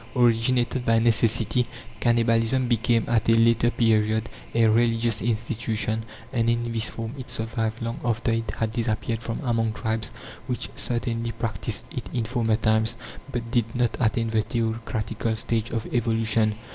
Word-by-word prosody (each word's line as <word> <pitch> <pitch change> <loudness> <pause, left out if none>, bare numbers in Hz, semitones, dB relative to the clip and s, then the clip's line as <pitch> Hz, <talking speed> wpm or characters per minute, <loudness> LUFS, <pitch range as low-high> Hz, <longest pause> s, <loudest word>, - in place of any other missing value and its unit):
Originated 120 +1 +2
by 115 -1 +3
necessity, 115 +1 +2 0.4
cannibalism 115 +1 +2
became, 115 0 +2
at 115 -1 +2
a - - +7
later 115 +1 +4
period, 110 -1 +2 0.3
a 115 -1 +5
religious 115 0 +2
institution, 115 -1 -1 0.3
and 115 -2 +2
in 120 0 0
this 115 -1 +2
form 115 +1 -5
it 130 - -8
survived 115 0 -2
long 115 0 -3
after 115 -1 0
it 115 -1 -1
had 110 -1 -1
disappeared 115 -1 -1
from 115 -1 -4
among 115 -3 +1
tribes 110 -2 -2 0.4
which 125 -3 -3
certainly 115 -1 -2
practised 115 -1 -3
it - - -5
in 120 -2 -1
former 115 -2 +1
times, 110 +1 +2 0.4
but 115 -2 -4
did 115 -2 0
not 120 -1 +1
attain 115 -1 +1
the 110 -1 +3
theocratical 115 0 -2
stage 115 0 -1
of 115 -2 -3
evolution. 115 -2 +2
115 Hz, 150 wpm, -25 LUFS, 110-120 Hz, 0.4 s, a